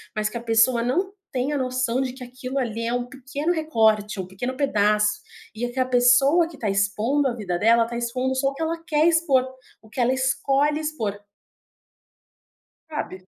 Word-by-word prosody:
mas 215 0 0
que 235 - -5
a - - -6
pessoa 230 +1 +3
não 360 +11 0 0.2
tem 265 +3 -1
a - - 0
noção 255 -1 -1
de 260 -2 -2
que 260 0 -10
aquilo 255 +2 -6
ali 230 -3 -2
é 235 - -1
um 245 0 -1
pequeno 280 +6 -3
recorte, 220 - +1
um 185 - -4
pequeno 245 +8 -5
pedaço 210 -5 +2 0.3
e 230 - -6
aquela 255 +1 -1
pessoa 255 +7 +4
que 330 -3 -13
tá 215 - -2
expondo 210 +8 +1
a 240 - -1
vida 190 -6 -3
dela, 230 +4 +4
tá 235 +1 -7
expondo 255 +2 -2
só 270 +1 +1
o - - -7
que 325 - -9
ela 330 +1 -1
quer 305 +1 +2
expor, 315 -6 +3 0.3
o 220 - -19
que 245 - -3
ela 245 +1 +3
escolhe 275 +3 +1
expor. 225 -10 -3 1.7
Sabe? 190 -12 -6
250 Hz, 190 wpm, -23 LUFS, 225-275 Hz, 1.7 s, pessoa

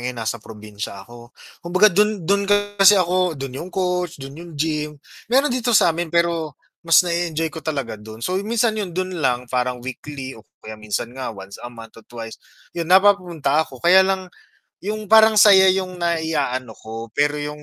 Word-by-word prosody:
ngayon 125 0 -4
nasa 115 0 -3
probinsya 105 -2 -9
ako. 120 +2 -15 0.2
Kumbaga 185 +4 +3
do'n 210 -1 +1
do'n 200 +3 +1
kasi 205 0 +4
ako 180 -2 +1
do'n 135 -1 -6
yung 175 - -7
coach, 180 -2 -2
do'n 135 -1 -9
yung 170 +3 -11
gym. 150 0 -2 0.3
Mayro'n 270 +3 +3
dito 245 -2 +2
sa'min 170 -2 +2
pero, 170 -3 0 0.2
mas 165 0 +5
na-e-enjoy 170 -2 -2
ko 160 - -7
talaga 140 -9 -4
do'n. 110 +2 -9
So, 185 +1 -1
yun 205 - -7
minsan 235 -1 +1
'yun 180 -4 -6
do'n 185 -2 -3
lang 125 -3 0
parang 125 0 -2
weekly 135 +1 -7
o 115 - -13 0.2
kaya 110 - -7
minsan 105 +3 -4
nga 130 0 -5
once 100 -2 -10
a 120 - -7
month 115 -1 -13
or - - -26
twice, 115 -2 -9 0.3
'yun 170 -1 -4
napapunta 180 -6 +3
ako. 140 -4 -5
Kaya 185 +2 +7
lang, 190 0 0 0.6
yung 215 0 -4
parang 220 +1 +7
saya 190 -2 +7
yung 185 -1 -3
naiaano 155 -8 -2
ko 115 +1 -8
pero 145 +1 +1
yung 150 0 -6
160 Hz, 185 wpm, -21 LUFS, 125-185 Hz, 0.6 s, Kaya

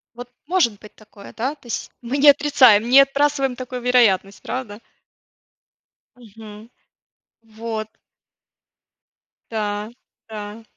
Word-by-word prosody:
Вот 245 +1 -10 0.2
может 310 - +1
быть 210 - -16
такое, 210 -2 -15
да? 260 +6 -3
То 280 - -28
есть, 235 - -5
мы 245 +3 -3
не 290 +1 +6
отрицаем, 260 -7 +4
не 270 +2 +8
отбрасываем 275 -1 0
такую 250 0 -7
вероятность, 215 -6 +2
правда? 220 -5 -6 1.4
Мгм. 220 -1 -14 0.7
Вот. 220 -1 -6 1.6
Да, 210 -1 -3 0.4
да. 210 +1 -8
230 Hz, 105 wpm, -20 LUFS, 215-260 Hz, 1.6 s, не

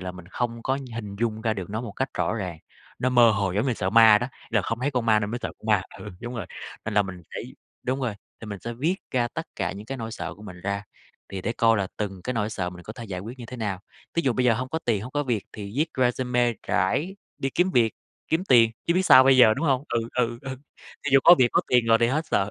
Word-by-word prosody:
là 90 0 -5
mình 90 -1 -12
không 115 +1 -3
có 135 +1 0 0.2
hình 105 -3 -6
dung 110 -2 -1
ra 110 -1 0
được 95 -2 -6
nó 110 +2 -2
một 115 -4 -6
cách 130 +5 -2
rõ - - 0
ràng, 90 -7 -4 0.4
nó 130 - +1
mơ 120 -2 +6
hồ 100 -3 0
giống 105 +7 0
như 125 - +1
sợ 95 - -2
ma 110 -1 +8
đó, 125 - -2 0.2
là 105 -3 +2
không 115 +4 -3
thấy 140 +3 0
con 125 -4 -1
ma 110 -1 +4
nên 105 - -2
mới 120 - -3
sợ - - -2
con - - -13
ma 105 -3 +3 0.2
ừ, 105 - -8
đúng 120 +1 -6
rồi, 110 -7 -4 0.4
nên 110 - -3
là 105 - +5
mình 90 -2 -8
phải - - -7 0.3
đúng 130 +2 -1
rồi, 120 -5 -1 0.3
thì 115 - -8
mình 100 -1 -6
sẽ 120 - -5
viết 150 +10 0 0.2
ra 120 -2 +1
tất - - -6
cả - - -1
những 100 +2 -9
cái 135 - -4
nỗi 115 -1 -5
sợ - - -5
của 105 - -15
mình 90 -4 -10
ra, 100 +1 -3 0.4
thì 95 - -5
để 115 - -1
coi 115 -1 +3
là 95 -2 -1
từng 95 -3 -4
cái 125 - -1
nỗi 110 -2 -1
sợ 90 -5 -3
mình 90 0 -11
có 110 - -7
thể 120 -1 -8
giải 95 -4 -5
quyết 120 +6 -8
như 120 - -8
thế 125 +2 -8
nào. 105 -5 -3 0.3
Ví 170 - +1
dụ 130 - +2
bây 125 +2 0
giờ 120 - +5
hông 130 +3 -3
có 160 - -2
tiền, 110 -4 +1
hông 125 - -8
có 145 - 0
việc 120 -7 -1
thì 100 -2 -7
viết 155 +3 +2
resume 125 -1 +1
rải 145 - 0 0.2
đi 135 - -1
kiếm 180 +5 +2
việc, 115 -7 +3 0.4
kiếm 165 +3 +1
tiền, 115 -9 +6 0.2
chứ 170 - +2
biết 185 - +3
sao 130 -7 +8
bây 135 0 +6
giờ, 110 -4 +7
đúng 155 +5 -2
hông? 135 -1 +2
Ừ, 120 - 0
ừ, 120 -1 0
ừ, 135 -1 -5 0.5
thí 145 - -1
dụ 135 - +8
có 175 - +10
việc 125 - +5
có - - +4
tiền 125 -2 +3
rồi 115 0 +5
thì 115 - +5
hết 155 +5 -1
sợ, 100 -9 +1
115 Hz, 290 wpm, -25 LUFS, 105-130 Hz, 0.5 s, có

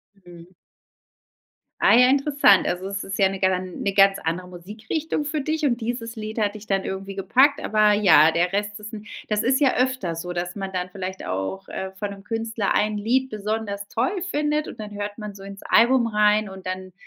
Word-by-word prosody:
Mhm. 175 -2 -15 1.3
Ah - - +6
ja 250 +1 +6
interessant. 275 -7 +4
Also 180 +2 -3
es 200 0 -4
ist 195 - -5
ja 195 - +5
'ne 195 -1 -6
gan 185 -1 -1
'ne 200 - -1
ganz 195 0 +5
andere 170 +3 -3
Musikrichtung 215 - -4
für 300 +1 -2
dich 310 +2 -2
und 245 -4 +1
dieses 230 0 -4
Lied 220 0 -6
hat 205 -1 0
dich 215 0 -10
dann 195 -2 0
irgendwie 195 +1 -5
gepackt, 265 +9 +3
aber 215 -1 +3
ja, 165 -7 +6
der 175 +2 +1
Rest 205 +1 -2
ist 210 0 -9
'n 210 -1 -9 0.2
das 210 0 0
ist 260 +4 +2
ja 265 - +4
öfter 255 -9 0
so, 175 +2 -6
dass 175 0 -3
man 195 -1 -5
dann 180 0 -3
vielleicht 190 0 -6
auch, 95 - -4
äh, 190 0 -5
von 200 +1 -5
'nem 200 -1 -10
Künstler 225 -1 -2
ein 210 0 +1
Lied 255 +5 0
besonders 210 -1 -4
toll 310 - -1
findet 300 0 0
und - - -9
dann 210 -1 -7
hört 205 0 -5
man 210 -2 -7
so 195 - -12
ins 195 0 -10
Album 240 0 +4
rein 210 -1 +2
und 190 -1 -11
dann, 185 0 -5
205 Hz, 205 wpm, -23 LUFS, 190-230 Hz, 1.3 s, Ah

